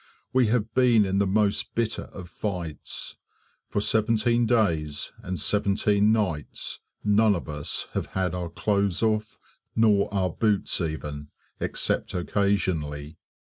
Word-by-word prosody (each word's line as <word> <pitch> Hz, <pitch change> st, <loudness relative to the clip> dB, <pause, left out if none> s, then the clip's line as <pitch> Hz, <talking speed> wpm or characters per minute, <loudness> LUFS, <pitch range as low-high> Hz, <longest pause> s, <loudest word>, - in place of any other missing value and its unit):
We 130 Hz, -2 st, +4 dB
have 110 Hz, -1 st, 0 dB
been 120 Hz, -5 st, +5 dB
in 95 Hz, 0 st, 0 dB
the 100 Hz, -, +2 dB
most 100 Hz, +1 st, +1 dB
bitter 115 Hz, -1 st, -1 dB
of 90 Hz, -3 st, -10 dB
fights. 85 Hz, -4 st, -4 dB, 0.5 s
For -, -, 0 dB
seventeen 115 Hz, +2 st, +2 dB
days 80 Hz, -11 st, +1 dB
and 90 Hz, -5 st, -4 dB
seventeen 100 Hz, +3 st, +2 dB
nights 90 Hz, -10 st, -2 dB, 0.2 s
none 105 Hz, 0 st, +4 dB
of 85 Hz, -, -5 dB
us 75 Hz, -1 st, -2 dB
have -, -, -2 dB
had 95 Hz, -2 st, -1 dB
our 90 Hz, -2 st, -3 dB
clothes 100 Hz, +2 st, 0 dB
off, 110 Hz, -1 st, 0 dB, 0.4 s
nor 105 Hz, -2 st, +3 dB
our 95 Hz, -3 st, 0 dB
boots 105 Hz, -1 st, +1 dB
even, 75 Hz, -3 st, -4 dB, 0.3 s
except -, -, -1 dB
occasionally. 85 Hz, -6 st, -1 dB
100 Hz, 130 wpm, -26 LUFS, 85-110 Hz, 0.5 s, been